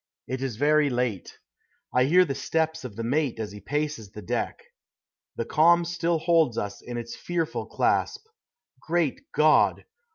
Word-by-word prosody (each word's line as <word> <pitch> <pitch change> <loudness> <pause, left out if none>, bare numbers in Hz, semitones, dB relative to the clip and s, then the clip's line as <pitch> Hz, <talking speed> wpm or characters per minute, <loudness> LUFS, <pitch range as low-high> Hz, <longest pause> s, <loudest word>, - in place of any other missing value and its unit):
It 130 0 -4
is 130 -4 -3
very 150 +3 +3
late. 120 -7 -2 0.6
I 125 0 +4
hear 180 +6 +5
the 140 - -2
steps 160 +3 -1
of 120 -6 -8
the 115 - -4
mate 130 0 0
as 105 -2 -4
he 105 - -9
paces 145 -2 -3
the 105 +1 -10
deck. 120 - -3 0.7
The - - -3
calm 170 +2 +4
still 170 0 0
holds 160 -7 +2
us 100 0 -4
in 120 -1 -6
its 115 0 -6
fearful 170 -2 -3
clasp. - - 0 0.5
Great 165 -4 -1
God! 155 +1 +3
145 Hz, 160 wpm, -26 LUFS, 120-160 Hz, 0.7 s, hear